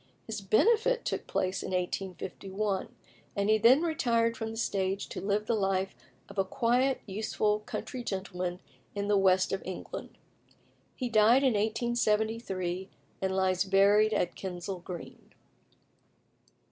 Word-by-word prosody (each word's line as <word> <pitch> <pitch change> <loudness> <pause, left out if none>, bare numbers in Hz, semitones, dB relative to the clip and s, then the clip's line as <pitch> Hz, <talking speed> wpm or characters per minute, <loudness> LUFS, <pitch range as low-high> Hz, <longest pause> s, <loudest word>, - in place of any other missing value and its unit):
His 220 -2 -5
benefit 460 - +3
took - - -3
place 185 0 -1
in - - -5
1851, 190 +2 -3 0.5
and 200 +1 +2
he 220 - +4
then 255 +8 +6
retired 235 -8 +1
from 225 -1 -4
the 225 - -7
stage 195 -3 -1
to - - -5
live 205 +1 0
the 230 - +1
life 195 -2 0 0.3
of 195 - -6
a - - +4
quiet, 250 +6 +1
useful 210 +1 0
country 245 +3 -6
gentleman 185 -3 -3 0.3
in 200 0 -2
the 205 - +3
west 190 -1 +4
of 195 - -1
England. 185 -1 -7 0.8
He 255 - -2
died 230 +3 +5
in 260 -3 +4
1873, 215 -4 0 0.3
and 190 0 0
lies 185 -1 +2
buried 200 +2 +4
at 175 -4 0
Kensal 185 0 -5
Green. 175 -1 -9
205 Hz, 135 wpm, -30 LUFS, 190-225 Hz, 0.8 s, then